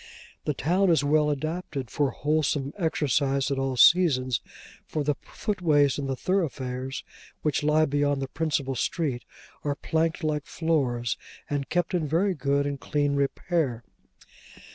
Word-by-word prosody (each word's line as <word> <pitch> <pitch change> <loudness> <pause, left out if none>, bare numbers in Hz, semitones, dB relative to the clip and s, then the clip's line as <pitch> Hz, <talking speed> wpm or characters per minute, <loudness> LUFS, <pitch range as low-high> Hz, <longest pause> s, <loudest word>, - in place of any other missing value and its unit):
The 150 - 0
town 180 +8 +2
is 165 -3 +4
well 150 +1 +3
adapted 145 - -3
for 145 +2 +1
wholesome 145 0 0
exercise 140 -6 +1
at 135 - 0
all 135 -1 -1
seasons, 130 - +5 0.5
for 155 - -2
the 145 +1 +1
footways 150 -9 +1
in 140 - -3
the 135 - -1
thoroughfares 135 -7 -2 0.4
which 150 -3 +1
lie 150 +1 +3
beyond 145 -1 +1
the 135 - -3
principal 145 -2 -1
street, 135 -1 -2 0.4
are 145 -1 -1
planked 160 +2 -1
like 150 -1 -1
floors, 130 -8 0 0.3
and 140 -1 -2
kept 175 +1 0
in 165 -4 0
very 180 +7 +2
good 140 -1 0
and 140 -1 -3
clean 145 0 0
repair. 140 -2 0
145 Hz, 140 wpm, -26 LUFS, 135-160 Hz, 0.5 s, seasons